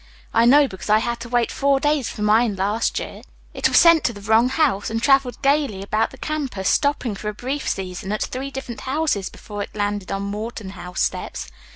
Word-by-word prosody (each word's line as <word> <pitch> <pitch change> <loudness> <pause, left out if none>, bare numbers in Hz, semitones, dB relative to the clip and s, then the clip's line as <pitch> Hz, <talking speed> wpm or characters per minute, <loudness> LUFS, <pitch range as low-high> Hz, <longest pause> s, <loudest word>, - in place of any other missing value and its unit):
I 230 - +4
know, 280 +4 +6
because 190 -2 -9
I 215 - +6
had 235 +2 -2
to 235 - -8
wait 240 -1 +1
four 275 -1 +2
days 295 -3 +1
for 210 - -5
mine 215 0 +3
last 205 +4 0
year. - - -5 0.3
It - - +2
was - - +3
sent 335 -2 +7
to 240 - +1
the 205 - -11
wrong 220 +4 +3
house, 265 -9 +1
and 225 0 -1
traveled 270 0 +2
gaily 275 -8 +1
about 215 +2 0
the 265 - -14
campus, 270 -11 -2
stopping 285 -6 +1
for 210 +1 -5
a 210 - -6
brief 265 +6 -3
season 190 0 -4
at 215 - -1
three 265 +2 -4
different 265 -3 -7
houses 265 -8 -1
before 205 -1 -8
it 200 - -7
landed 205 -2 -2
on 195 0 -2
Morton 210 0 -5
House 180 -2 -6
steps. - - -3
230 Hz, 215 wpm, -22 LUFS, 205-275 Hz, 0.3 s, sent